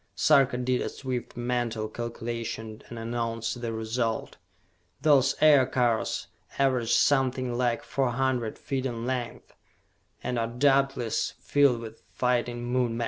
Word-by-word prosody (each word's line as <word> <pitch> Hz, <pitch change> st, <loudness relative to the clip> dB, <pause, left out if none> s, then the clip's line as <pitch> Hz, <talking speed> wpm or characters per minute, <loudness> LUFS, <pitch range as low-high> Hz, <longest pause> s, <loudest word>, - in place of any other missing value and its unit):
Sarka 130 Hz, +5 st, +4 dB
did 125 Hz, 0 st, 0 dB
a -, -, -2 dB
swift 125 Hz, -3 st, -5 dB
mental 120 Hz, -3 st, -1 dB
calculation, 115 Hz, -1 st, -5 dB
and 120 Hz, -, -8 dB
announced 115 Hz, 0 st, -3 dB
the 115 Hz, -1 st, -2 dB
result. 110 Hz, +1 st, -2 dB, 0.7 s
"Those 140 Hz, -3 st, +4 dB
Aircars 130 Hz, -6 st, +3 dB, 0.3 s
average 130 Hz, -4 st, +2 dB
something 130 Hz, -3 st, +2 dB
like 120 Hz, -1 st, 0 dB
four 135 Hz, -2 st, 0 dB
hundred 120 Hz, -2 st, -1 dB
feet 135 Hz, -1 st, -2 dB
in 120 Hz, -2 st, -4 dB
length, 125 Hz, -2 st, -4 dB, 0.7 s
and 125 Hz, -1 st, -1 dB
are 115 Hz, -, 0 dB
doubtless 135 Hz, -1 st, +1 dB
filled 140 Hz, -5 st, +3 dB
with 115 Hz, -1 st, -9 dB
fighting 120 Hz, -1 st, 0 dB
Moon 125 Hz, -1 st, 0 dB
men!" -, -, -4 dB
120 Hz, 130 wpm, -27 LUFS, 115-130 Hz, 0.7 s, Sarka